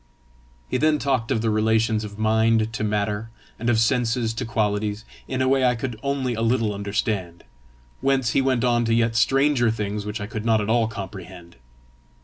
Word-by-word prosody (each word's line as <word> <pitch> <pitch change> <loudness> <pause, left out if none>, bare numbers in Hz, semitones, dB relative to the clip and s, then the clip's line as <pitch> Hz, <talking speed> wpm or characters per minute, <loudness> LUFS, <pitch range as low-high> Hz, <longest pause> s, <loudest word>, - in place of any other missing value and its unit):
He - - -1
then 155 +3 +3
talked 130 -5 -1
of 115 -5 0
the 110 - +1
relations 110 0 +1
of 105 -1 -8
mind 110 0 +2
to 110 - -3
matter, 105 +1 -1 0.3
and 120 +2 -1
of 115 -2 +3
senses 115 -1 +1
to 120 +3 -4
qualities, 105 -2 -1 0.2
in 130 0 -1
a - - +1
way 135 0 +3
I 125 -1 +3
could 115 -2 -5
only 135 -2 -1
a 115 - -3
little 115 -2 +1
understand, 100 -3 -3 0.6
whence 135 -3 +1
he 135 - +2
went 130 -2 +1
on 120 -1 +2
to 115 0 +2
yet 115 -1 +1
stranger 135 0 +3
things 105 -2 -3
which 105 +1 -5
I 105 - -4
could 110 0 -5
not 110 -1 +3
at 105 +1 -1
all 115 -1 +3
comprehend. 95 -4 -9
115 Hz, 190 wpm, -23 LUFS, 105-125 Hz, 0.6 s, then